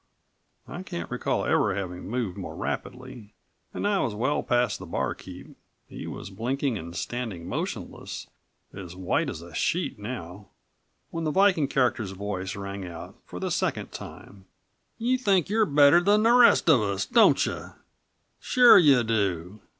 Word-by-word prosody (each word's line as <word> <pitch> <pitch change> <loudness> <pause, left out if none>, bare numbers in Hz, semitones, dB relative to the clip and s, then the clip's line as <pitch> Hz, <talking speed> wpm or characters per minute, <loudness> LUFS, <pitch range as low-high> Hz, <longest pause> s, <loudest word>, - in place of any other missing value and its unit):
I 175 - -7
can't 85 - -6
recall - - -1
ever 95 - +2
having 90 -2 -5
moved 115 -6 -2
more - - -7
rapidly, 125 -4 -6 0.4
and - - -2
I 205 -1 +1
was 110 - -1
well 130 +7 0
past 120 -3 0
the - - -9
barkeep - - -5 0.3
he - - -8
was 95 - -7
blinking 125 +5 -2
and 85 -3 -7
standing 110 -8 -5
motionless, - - -5 0.5
as 90 -3 -9
white 95 -1 -1
as 80 - -7
a 85 -1 -13
sheet 170 - -1
now 100 -4 -7 0.6
when 165 0 -4
the 155 - 0
Viking 190 -3 +3
character's 120 -7 0
voice 95 -1 -4
rang 100 0 -6
out 85 -2 -9
for - - -8
the - - -3
second - - -2
time. 95 -1 -11 0.5
"You 245 +3 0
think 195 -7 +2
you're 215 0 +2
better 145 +3 +6
than 205 +3 +3
the 230 - +5
rest 245 -6 +6
of 145 -8 +6
us, 100 -2 -1
don't - - +4
you? - - -6 0.7
Sure 245 -5 +7
you 140 -8 +5
do. 100 -3 -2
115 Hz, 160 wpm, -26 LUFS, 95-160 Hz, 0.7 s, Sure